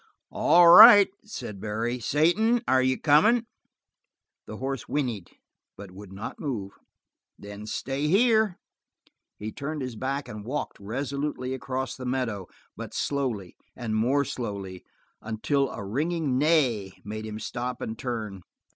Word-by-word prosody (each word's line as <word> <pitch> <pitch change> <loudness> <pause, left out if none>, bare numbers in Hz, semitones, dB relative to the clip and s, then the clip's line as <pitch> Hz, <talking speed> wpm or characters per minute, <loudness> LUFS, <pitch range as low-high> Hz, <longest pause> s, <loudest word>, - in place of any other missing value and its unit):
"All 170 +3 +5
right," 205 +3 +10
said 105 - -8
Barry. 115 +3 -2
"Satan, 175 - +2
are 130 0 +4
you 130 0 +1
comin'?" 210 +11 +4 1.0
The - - -7
horse 135 -2 -4
whinnied, 120 -11 -2 0.5
but 100 -2 -10
would 95 +1 -12
not 100 +3 -7
move. 110 -10 -4 0.7
"Then 100 +1 -10
stay 135 +6 -3
here." 220 +1 +3 0.8
He 110 +1 -6
turned 145 +2 -5
his 125 -2 -5
back 135 +4 -3
and 105 -1 -8
walked 140 +7 -4
resolutely 135 +4 -4
across 130 0 -4
the 130 -1 -7
meadow, 115 -7 -2 0.3
but - - -8
slowly, 125 -10 -2 0.2
and 115 -3 -3
more 130 +6 +2
slowly, 100 -7 -6 0.4
until 130 +6 -1
a 100 - -7
ringing 150 - -1
neigh 130 - +2
made 110 +1 -6
him 105 0 -6
stop 125 +3 -5
and 110 - -5
turn. 110 -5 -5
130 Hz, 135 wpm, -26 LUFS, 110-150 Hz, 1.0 s, right